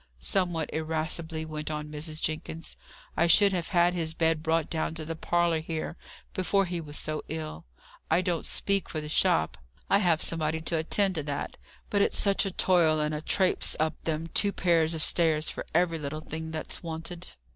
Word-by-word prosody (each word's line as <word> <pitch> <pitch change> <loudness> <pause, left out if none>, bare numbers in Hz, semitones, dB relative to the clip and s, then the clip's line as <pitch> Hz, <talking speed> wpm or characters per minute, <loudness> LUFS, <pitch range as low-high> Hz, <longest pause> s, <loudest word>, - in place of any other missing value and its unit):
somewhat 175 - +1
irascibly 160 0 -2
went 155 -1 -4
on 150 -1 -4
Mrs. 155 +1 -3
Jenkins: 160 +1 -4 0.4
"I 170 - +3
should 200 +3 +6
have 175 -2 -1
had 175 -1 +3
his 160 -2 -2
bed 160 -1 +2
brought 160 0 +1
down 160 -1 -2
to 160 -1 -6
the 165 +1 -4
parlour 170 0 +1
here, 160 +1 -4 0.4
before 195 +1 +2
he 175 -1 -3
was 150 -2 -6
so 155 -1 -2
ill. 155 - -6 0.4
I 180 - +4
don't 175 -2 -1
speak 200 -2 +1
for 155 - -3
the 150 - -6
shop, 80 - +2 0.3
I 200 - +6
have 175 -5 +3
somebody 160 -1 +1
to 160 +1 -1
attend 190 +4 +2
to 155 -4 -3
that; 145 -1 -3 0.4
but 205 - +3
it's - - +1
such 200 0 +2
a - - -3
toil 170 -4 +3
and 150 0 0
a 150 - -3
trapes 185 +3 +2
up 155 +1 -1
them 160 0 -2
two 200 +5 +3
pair 170 -4 +3
of 160 0 0
stairs 160 -2 +2
for - - -7
every 170 -1 +2
little 155 +1 -4
thing 160 +1 -6
that's 160 -1 -5
wanted." 170 +1 -6
160 Hz, 190 wpm, -28 LUFS, 155-175 Hz, 0.4 s, should